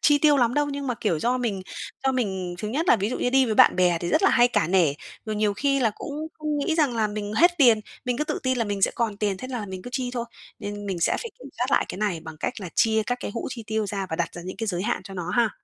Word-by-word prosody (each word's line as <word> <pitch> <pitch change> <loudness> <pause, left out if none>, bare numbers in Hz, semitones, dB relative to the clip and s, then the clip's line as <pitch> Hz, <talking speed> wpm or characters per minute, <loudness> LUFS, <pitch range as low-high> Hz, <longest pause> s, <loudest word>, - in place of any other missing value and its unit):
chi 290 -1 +5
tiêu 295 -1 +5
lắm 245 -2 +2
đâu, 295 0 +2
nhưng 280 0 -4
mà, 250 - 0
kiểu, 180 -8 -1
do 245 +8 +1
mình 210 -6 -2 0.4
do 265 - +3
mình 190 -8 -2
thứ 210 - -3
nhất 310 +9 -1
là - - +7
ví 205 +3 -1
dụ - - -3
như 245 - 0
đi 265 0 +5
với 220 - 0
bạn - - +6
bè 180 -2 +3
thì 175 - -2
rất - - +2
là - - +5
hay 240 -1 +5
cả 160 - +1
nể, 175 -6 +4 0.3
rồi 215 -1 -3
nhiều 210 -1 +1
khi 275 +4 +1
là 225 -3 +3
cũng 300 +2 -5
không 305 0 -4
nghĩ 315 +3 0
rằng 285 -7 +2
là 220 -1 +2
mình 210 0 -4
hết 340 +10 +5
tiền, 235 -6 +6 0.2
mình 245 -1 0
cứ 300 - 0
tự - - -2
tin 260 -1 +1
là 230 - +1
mình 200 -2 -3
sẽ - - +5
còn 225 -4 -1
tiền, 205 -2 -1
thế 255 +5 -7
là 235 -5 -4
mình 185 -1 -7
cứ 245 - -8
chi 255 -2 -2
thôi, 240 -2 -2 0.3
nên 205 -1 -6
mình 185 -3 -3
sẽ - - +2
phải 465 - -6
kiểm 265 +2 -11
soát 250 - +1
lại - - +3
cái - - -6
này 200 -6 -1
bằng 160 -1 -9
cách - - -1
là 185 - -5
chia 220 -1 +3
các 245 0 -1
cái - - -4
hũ - - -3
chi 230 - -6
tiêu 220 -1 -1
ra 195 -1 -3
và 160 - -2
đặt 170 - -1
ra 175 - -7
những 185 +1 -7
cái 225 - -3
giới 180 -2 -1
hạn 240 -3 -1
cho 195 - -9
nó 180 -1 -4
ha? 235 0 +2
220 Hz, 320 wpm, -25 LUFS, 195-255 Hz, 0.4 s, là